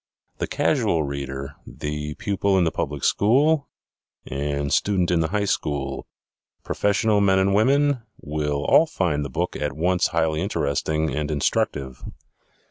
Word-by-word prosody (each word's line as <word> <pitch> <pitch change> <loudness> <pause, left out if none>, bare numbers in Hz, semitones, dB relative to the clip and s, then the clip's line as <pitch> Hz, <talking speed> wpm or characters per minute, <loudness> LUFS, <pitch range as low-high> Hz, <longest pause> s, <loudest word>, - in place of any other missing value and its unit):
The - - -1
casual 80 -2 +1
reader, 70 -1 -5
the 75 0 -5
pupil 100 -1 0
in 90 - +4
the 80 - +1
public 75 -1 -3
school 140 +8 +3 0.6
and 70 +1 -2
student 95 -4 +2
in 85 - +3
the 80 - +1
high 100 +4 -1
school, 70 -7 -2 0.6
professional 105 +1 +1
men 95 -1 +4
and 95 +1 +2
women, 135 +5 +3 0.2
will 75 -1 -2
all 165 - +5
find 85 - -1
the 70 - -5
book - - -2
at 75 - -2
once 90 +2 +2
highly 80 -2 0
interesting 80 -3 -1
and 75 0 -2
instructive. 70 -3 -1
80 Hz, 140 wpm, -23 LUFS, 75-100 Hz, 0.6 s, all